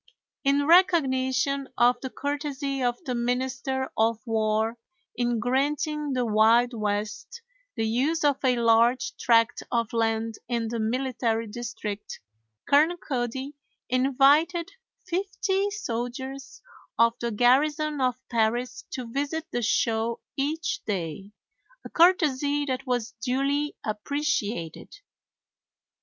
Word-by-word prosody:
In 280 0 +2
recognition 275 -5 +3
of 245 0 +4
the 260 - -4
courtesy 285 -1 -3
of 245 -1 0
the 255 - -3
Minister 260 +2 -2
of 225 0 +2
War 220 +1 0 0.4
in 240 -1 0
granting 285 +4 0
the 250 -1 0
Wild 225 +3 +4
West 210 - -3 0.3
the 225 - -1
use 275 +9 0
of 285 -2 +2
a 255 -1 +3
large 235 +1 +3
tract 230 -2 +3
of 230 -2 0
land 225 -1 -1
in 230 -2 -1
the 230 0 -3
military 230 -1 -1
district, 215 -2 -6 0.5
Colonel 310 +5 +4
Cody 265 -1 -3 0.4
invited 275 +7 +3 0.4
fifty 385 +2 -1
soldiers 265 - -5 0.3
of 230 0 +4
the 235 - -2
garrison 290 +6 +2
of 255 -2 +2
Paris 240 +2 -1
to 255 - -4
visit 285 +6 -3
the 240 - -1
show 225 0 0 0.2
each 305 +4 -2
day, 190 -1 -4 0.5
a - - -8
courtesy 290 -5 +3
that 260 0 -3
was 245 -2 -1
duly 275 +4 0
appreciated. 215 - -3
255 Hz, 115 wpm, -26 LUFS, 230-285 Hz, 0.5 s, of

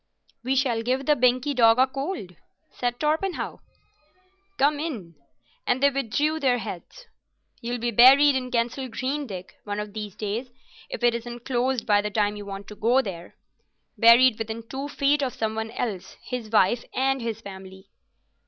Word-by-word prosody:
"We 260 +2 0
shall 250 -4 +1
give 255 +3 -1
the 300 - +4
Binkie 255 +2 +2
dog 230 -3 +5
a 260 - +6
cold," 270 - -5 0.4
said 245 -1 -3
Torpenhow. 315 +5 -1 1.0
"Come 290 +2 +2
in," 235 - -5 0.5
and 255 +2 +1
they 280 - +5
withdrew 285 +4 0
their 260 -4 +2
heads. 225 - -8 0.6
"You'll 240 0 -3
be 240 0 -2
buried 270 +5 +7
in 255 -1 -2
Kensal 250 +2 -1
Green, 260 +5 -3
Dick, 185 -3 -9
one 205 0 -4
of 210 -1 -6
these 210 -3 -6
days, 220 +4 -4 0.4
if - - -6
it 240 -1 +4
isn't 240 0 -6
closed 255 -1 0
by 205 -1 +3
the 210 - -3
time 210 0 0
you 205 -1 -8
want 195 0 -7
to 210 - -9
go 240 +6 +2
there—buried 230 +6 +1
within 225 +1 -5
two 270 +3 -5
feet 285 +1 +1
of 260 -3 -2
some 220 -1 -2
one 220 0 -3
else, 220 -5 -5
his 245 -4 -5
wife 220 +2 +3
and 270 0 +1
his 225 -2 -3
family." 190 -1 -11
240 Hz, 170 wpm, -25 LUFS, 215-270 Hz, 1.0 s, buried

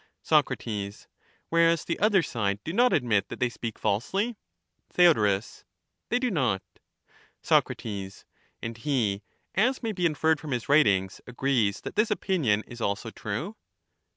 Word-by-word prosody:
Soc, - - +4 1.0
Whereas 165 -1 +3
the 170 - -2
other 205 -4 +4
side 100 -7 -1
do 160 - -4
not 245 +4 +4
admit 115 -7 +2
that - - -7
they 125 - +2
speak 115 -2 -6
falsely? 190 - -1 0.6
Theod. 105 - +4 0.7
They 245 - +2
do 250 -1 0
not 125 - 0 0.8
Soc. - - +3 0.9
And 115 0 -5
he, 115 -7 0 0.3
as 250 +6 +1
may 225 - -1
be 180 -4 +1
inferred 160 0 +1
from 150 -3 -5
his 120 -3 -3
writings, 100 -11 +3
agrees 125 -5 0
that - - -7
this 215 +2 +2
opinion 155 - +1
is 120 -1 -10
also 105 +3 -2
true. 115 - -5
135 Hz, 140 wpm, -27 LUFS, 110-180 Hz, 1.0 s, Soc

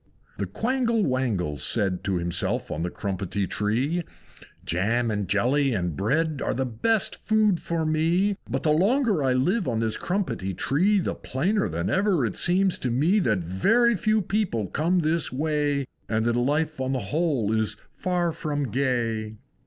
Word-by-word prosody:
II. - - -36
The - - 0
Quangle 235 -2 0
Wangle 110 - -1
said 95 +5 0
To 95 - 0
himself 85 0 -1
on 75 - -3
the 90 - -1
Crumpetty 100 +1 -3
Tree, 125 - 0 0.6
"Jam, 115 +7 0
and 105 -2 -2
jelly, 130 +8 +2
and 90 -5 -2
bread 150 - 0
Are - - -1
the 130 +2 0
best 195 - 0
of - - -26
food 215 -4 +2
for 165 -1 -2
me! 170 +6 +2
But - - -2
the 155 - +3
longer 205 - +2
I 130 -1 +2
live 180 - +1
on 115 -3 0
this 110 -1 -1
Crumpetty 175 - -2
Tree 185 - +2
The 180 - -1
plainer 170 - -1
than 85 +1 -2
ever 190 - +2
it 110 - -3
seems 185 +1 +2
to 125 - -1
me 155 - +2
That 110 - +1
very 225 - +3
few 215 +2 +1
people 185 - -1
come 170 - +1
this 160 +1 0
way 145 0 0 0.2
And 110 0 0
that 120 0 +1
life 145 +4 0
on 130 +1 -1
the 130 - 0
whole 145 -10 +1
is 110 -1 0
far 175 -2 -1
from 145 -4 -3
gay!" 115 -4 -1
140 Hz, 175 wpm, -25 LUFS, 110-180 Hz, 0.6 s, the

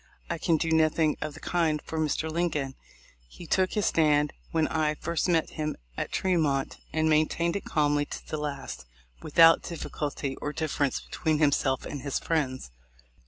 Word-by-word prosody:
I - - -2
can 165 - +2
do 160 +1 -1
nothing 160 -1 +3
of 150 - -4
the - - -10
kind 160 -4 +1
for 160 +2 -5
Mr. 155 +1 0
Lincoln. 155 -5 -1 0.5
He 170 - -12
took 185 +3 +1
his 210 -2 +1
stand 150 -2 +3 0.2
when 160 -1 +1
I 155 -1 0
first 170 +3 -1
met 165 -2 +2
him 155 -1 -3 0.2
at - - -3
Tremont, 155 -7 +1
and 160 +1 +1
maintained 160 +3 +2
it 200 - -3
calmly 145 -1 +1
to - - -8
the 155 - -3
last, 140 - -5 0.4
without 165 +2 +6
difficulty 145 -4 -4
or 150 - -4
difference 145 -3 -1
between 160 -2 -1
himself 140 -3 +2
and 145 - -5
his 140 0 -2
friends. 130 - -2
155 Hz, 165 wpm, -28 LUFS, 145-165 Hz, 0.5 s, without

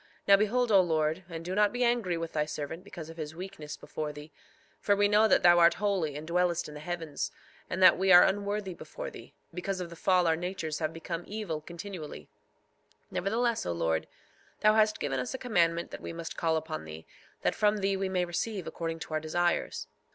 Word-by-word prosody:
Now 200 - +9
behold, 225 +4 +1
O 195 -2 +7
Lord, 160 0 0
and 165 -1 -7
do 180 - -3
not 210 +1 +3
be 245 0 -1
angry 235 -8 +1
with 165 0 -5
thy 150 -1 +1
servant 155 +3 -5
because 170 -5 -9
of 165 - -14
his 155 -1 -6
weakness 175 -5 -7
before 155 -1 -5
thee; 150 +1 -11 0.5
for 205 - +2
we 205 0 +4
know 210 +2 +5
that - - +4
thou 175 0 +7
art 170 0 +6
holy 190 -8 0
and 150 +1 -6
dwellest 175 0 +1
in 150 - -9
the 150 - -8
heavens, 165 -2 -4 0.4
and 185 - 0
that 185 - +8
we 190 0 +3
are 175 - +10
unworthy 200 0 -1
before - - -7
thee; - - -12 0.2
because 185 +2 -3
of 175 -2 -5
the - - -8
fall 180 +1 +3
our 165 -1 +3
natures 170 -2 -4
have 155 -1 -1
become 165 +1 -5
evil 200 -7 -4
continually; 170 -1 -8 0.8
nevertheless, 230 +4 0
O 85 - -2
Lord, 80 -1 0 0.5
thou 215 0 +6
hast 215 0 +3
given 135 -2 -1
us 125 - -3
a - - -3
commandment 170 -9 +1
that - - -7
we - - -6
must 165 0 -6
call 160 -1 +1
upon 155 - -5
thee, 80 +1 -9 0.4
that - - +2
from 210 0 +2
thee 195 -1 +1
we 190 0 -1
may 180 -1 +1
receive 185 +2 -3
according 165 -1 -4
to 155 - -6
our 155 - +1
desires. 175 +3 -1
175 Hz, 215 wpm, -30 LUFS, 160-200 Hz, 0.8 s, are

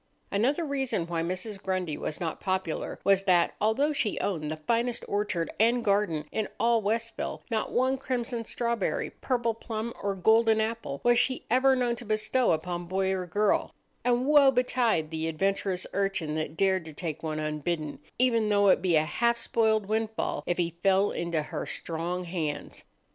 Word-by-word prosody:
Another 270 +11 +1
reason 270 - -1
why 170 -1 -2
Mrs. 185 +4 -3
Grundy 185 -5 -2
was 155 - -4
not 165 -3 -3
popular 185 -4 -2
was 195 -1 +3
that, 175 -2 +3
although 270 +8 +2
she 220 -7 -1
owned 160 -7 -2
the 155 - -3
finest 235 +8 -1
orchard 200 -5 -1
and 235 +2 +3
garden 200 -7 +1
in 215 -1 -1
all 235 -1 +3
Westville, 225 +2 -2
not 220 -1 -1
one 260 +2 +1
crimson 245 -3 -2
strawberry, 235 -2 -2
purple 240 -3 -1
plum, 225 0 -5
or 200 -1 -1
golden 220 +3 +4
apple 220 -10 -3
was 240 0 +5
she 255 +1 0
ever 260 +2 +5
known 245 -2 +1
to - - -8
bestow 215 +3 +1
upon 175 +2 -2
boy 190 +1 0
or 185 -1 -2
girl; 205 +5 +1 0.3
and 245 +1 +2
woe 290 -1 +6
betide 245 -10 +1
the 160 0 -2
adventurous 190 +2 -1
urchin 195 -6 -1
that 155 +1 -3
dared 190 -1 +2
to 160 - -9
take 160 0 -5
one 155 -1 -3
unbidden, 155 0 -3 0.2
even 230 -4 +2
though 205 -1 +4
it 185 - +4
be 180 -3 +2
a 155 - +4
half 235 +10 +1
spoiled 220 -2 +1
windfall, 220 +1 -1
if 175 - 0
he 170 -1 0
fell 195 +1 +3
into 170 -2 -1
her - - -5
strong 175 +2 -4
hands! 160 -5 -4
200 Hz, 175 wpm, -28 LUFS, 170-235 Hz, 0.3 s, woe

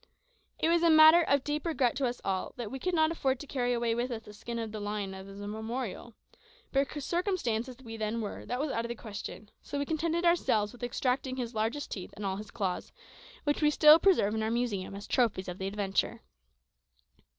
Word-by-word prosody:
It - - +1
was 340 0 +3
a 340 - +5
matter 315 +2 +9
of 280 -4 +2
deep 295 0 -2
regret 285 -8 +1
to 270 -2 +1
us 240 0 -4
all 190 -1 -1
that 235 -4 -5
we 265 - -5
could 365 +5 -1
not 315 0 +3
afford 265 -5 0
to 290 - -7
carry 250 -3 -1
away 235 -1 +1
with 240 +2 -1
us 225 -2 -5
the 210 -2 -12
skin 235 +3 -6
of 225 -2 -3
this 215 -1 -5
lion 205 -1 -3
as 190 0 -9
a 205 - -6
memorial; 225 +1 -5 0.6
but 275 0 +2
circumstanced 335 - -1
as 250 - -10
we 225 -2 -7
then 220 +1 -2
were, 210 -3 -5
that 245 - -2
was 295 0 -1
out 230 - -1
of 235 - -5
the 235 - -3
question, 215 -1 -8
so 285 - -5
we 285 - -1
contented 330 +3 0
ourselves 220 -12 +3
with 245 - -14
extracting 255 +2 -1
his 245 -2 -4
largest 225 +6 -2
teeth 185 - -6
and 205 - -6
all 190 0 -1
his 210 0 -8
claws, 195 -6 -3 0.5
which 290 +1 0
we 300 - +5
still 300 +1 +8
preserve 335 - +4
in 220 - -1
our 220 - 0
museum 225 -5 -1
as 200 - -7
trophies 225 -6 +1
of 180 0 -6
the 190 - -2
adventure. 200 +3 -1
240 Hz, 225 wpm, -30 LUFS, 210-290 Hz, 0.6 s, matter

